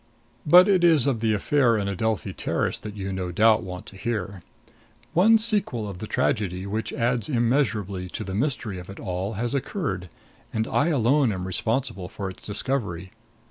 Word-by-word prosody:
But 180 +5 +8
it 190 -3 +3
is 160 -6 +5
of 135 -5 +1
the 110 0 +1
affair 120 +1 +2
in 100 -1 -1
Adelphi 100 -1 -1
Terrace - - -1
that 105 0 -8
you 95 -1 -4
no 90 -1 -3
doubt 110 +4 +4
want 90 0 -7
to - - -12
hear. 100 -3 -3 0.7
One 215 +6 +6
sequel 205 - 0
of 95 -3 -7
the 110 - -6
tragedy, 100 -8 -1
which 110 +3 -3
adds 120 +2 0
immeasurably 115 -7 0
to - - -5
the 95 - -6
mystery 110 -4 -1
of 90 - -11
it 100 - -9
all, 95 +3 -3
has 115 +4 -2
occurred, 130 - -3 0.4
and 110 0 -1
I 145 - +1
alone 135 -3 +3
am 90 -2 -4
responsible 100 0 -2
for 100 -3 -5
its - - -16
discovery. 105 -5 -2
110 Hz, 180 wpm, -25 LUFS, 95-135 Hz, 0.7 s, But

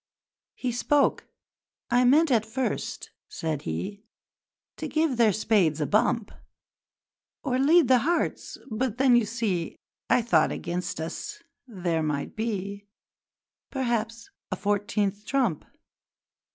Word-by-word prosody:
He 255 - -2
spoke. 280 +4 +1 0.6
'I 245 +1 +4
meant 295 +4 +5
at 225 -4 +4
first,' 255 +4 -3 0.2
said 155 -3 -3
he, 85 - -4 0.8
'To - - -4
give 315 -4 +1
their 230 -3 +5
spades 190 -7 +2
a 150 - +1
bump: 215 - +1 1.1
Or 255 -2 0
lead 310 +2 +5
the 255 0 +5
hearts, 335 +8 -1
but 230 +1 -1
then 260 -1 +5
you 235 -3 +3
see 205 -7 -2 0.3
I 245 - +4
thought 175 -9 +3
against 180 -1 -4
us 415 - -6 0.2
there 175 -7 -1
might 150 -2 -2
be, 200 -2 -4 0.8
Perhaps, 230 -3 -2 0.2
a - - 0
fourteenth 205 0 -1
trump!' 240 - 0
225 Hz, 120 wpm, -26 LUFS, 195-255 Hz, 1.1 s, meant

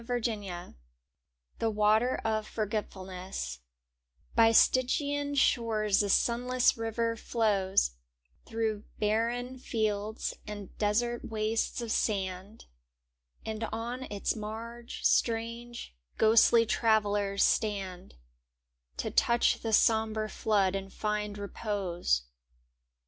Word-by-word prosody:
i^^ft 240 0 -2
Zbe 200 -6 -4 0.9
Matet 220 +2 +2
of 215 -1 0
S^oroetfulness 190 - -4 0.8
Y 225 -1 +6
Stygian 285 +4 +2
shores 220 -6 +2
a 205 - -1
sunless 245 +5 +3
river 230 0 -1
flows, 200 - +1 0.6
Through 220 -2 -2
barren 235 +4 0
fields 215 -2 -2
and 205 -2 -8
desert 235 +3 0
wastes 220 +2 -1
of 230 -2 -4
sand; 195 0 -2 0.8
And 220 0 -4
on 235 +4 -4
its 205 +2 -1
marge 230 +2 -7
strange, 230 - 0 0.2
ghostly 230 +1 +5
travellers 205 -3 +2
stand 195 - -1 0.8
To - - -3
touch 235 0 +3
the 225 - -2
sombre 220 0 +2
flood 200 -4 +1
and 195 0 -4
find 210 -1 -2
repose. 195 - -1
220 Hz, 95 wpm, -30 LUFS, 205-230 Hz, 0.9 s, Y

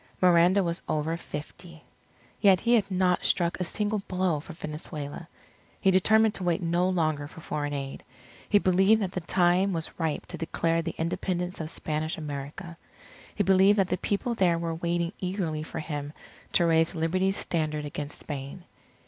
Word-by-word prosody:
Miranda 180 +2 +5
was 170 -1 -2
over 155 +2 0
fifty. 165 +1 -9 0.6
Yet 195 -3 +5
he 235 +1 +2
had 210 -4 +3
not 185 -1 +1
struck 170 -1 +1
a - - 0
single 210 +3 -1
blow 180 -4 0
for 160 - -10
Venezuela. 150 -1 -6 0.5
He 195 - +4
determined 220 +3 +4
to 190 - -3
wait 175 -2 +1
no 175 +2 +2
longer 155 -5 0
for 155 - -13
foreign 145 -2 -3
aid. 135 -1 -5 0.5
He 205 - +5
believed 195 +3 +4
that 185 - -2
the 185 - -3
time 180 +3 +2
was 165 -1 -3
ripe 160 -3 -1
to - - -6
declare 165 0 0
the 165 - -5
Independence 180 +1 -2
of 155 - -4
Spanish 155 0 -2
America. 150 +3 -6 0.6
He 205 - +1
believed 190 +2 +5
that 190 -2 +2
the 180 - 0
people 210 +6 -1
there 180 -6 +2
were 165 0 -2
waiting 170 +1 -1
eagerly 180 -5 -2
for 160 +2 -7
him 150 -2 -5 0.4
to 175 - +4
raise 165 +1 +3
Liberty's 185 +4 +1
standard 155 -3 -1
against 145 0 -6
Spain. 140 +4 -6
170 Hz, 170 wpm, -27 LUFS, 155-185 Hz, 0.6 s, Miranda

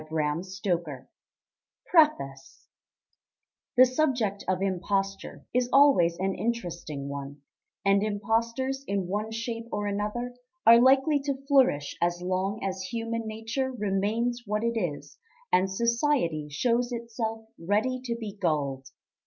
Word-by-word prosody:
Published 160 +6 -2
November, 170 -8 -2 0.8
1910 305 - +5
PREFACE 135 0 -16 1.1
The 255 - +9
subject 250 -7 0
of 185 -1 +1
imposture 195 +1 -2
is 250 0 +1
always 270 -13 +5
an 190 +1 0
interesting 175 -12 -4
one, 140 0 -7 0.4
and 195 0 +4
impostors 230 +6 -1
in 200 -2 -1
one 205 +4 -2
shape 230 +1 -4
or 205 0 -2
another 210 +5 -2 0.3
are 230 +1 +8
likely 270 +3 +5
to 275 -1 -4
flourish 260 - +3
as 175 0 +1
long 185 +3 -2
as 190 -1 -2
human 230 +2 -3
nature 225 +5 -3
remains 220 +2 -1
what 210 +1 -1
it 235 0 0
is, 175 -10 -4 0.3
and 190 +1 +4
society 235 - +1
shows 240 - 0
itself 230 -1 -4
ready 215 +9 0
to 235 -2 -1
be 215 -3 -6
gulled. 140 -8 -1
210 Hz, 130 wpm, -27 LUFS, 180-240 Hz, 1.1 s, The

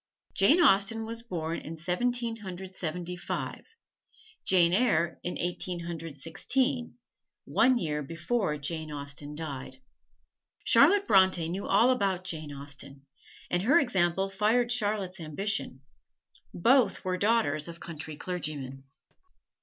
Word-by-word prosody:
Jane 275 - +5
Austen 225 - +4
was 230 +1 -6
born 170 -7 -4
in 160 +2 -8
Seventeen 230 +7 -1
Hundred 190 -2 -8
Seventy 175 0 -4
five; 175 - -5 0.8
"Jane 175 -2 +4
Eyre" 170 -7 +2
in 175 - -3
Eighteen 175 0 -2
Hundred 165 -3 -6
Sixteen 250 - -1 0.5
one 255 -1 +3
year 150 -8 -2
before 165 - -2
Jane 155 +1 -3
Austen 145 0 -6
died. 140 -4 -6 0.9
Charlotte 405 0 +5
Bronte 185 -4 +4
knew 190 +4 -4
all 230 +6 +5
about 195 -7 0
Jane 155 -5 -4
Austen, 140 -1 -7 0.5
and 175 - +2
her 270 - +5
example 190 - +1
fired 220 +5 +1
Charlotte's 205 -5 0
ambition. 160 -3 -2 0.7
Both 235 +2 +3
were 185 0 0
daughters 180 -8 +1
of 170 0 -9
country 155 -2 -7
clergymen. 145 -7 -5
180 Hz, 120 wpm, -29 LUFS, 155-215 Hz, 0.9 s, Jane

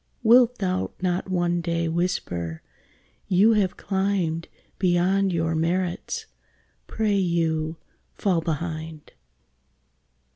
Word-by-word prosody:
Wilt 245 +1 +6
thou 185 -2 -1
not 180 +1 -1
one 175 -1 +1
day 170 0 -1
whisper, 90 - -2 0.6
"You 200 +4 +5
have 195 -4 +1
climbed 190 -4 -1 0.3
Beyond 190 +1 +2
your 165 -1 0
merits; 180 - -1 0.6
pray 215 -2 0
you, 165 -3 0 0.4
fall 180 -5 +1
behind"? 160 -1 -4
175 Hz, 95 wpm, -25 LUFS, 165-195 Hz, 0.6 s, Wilt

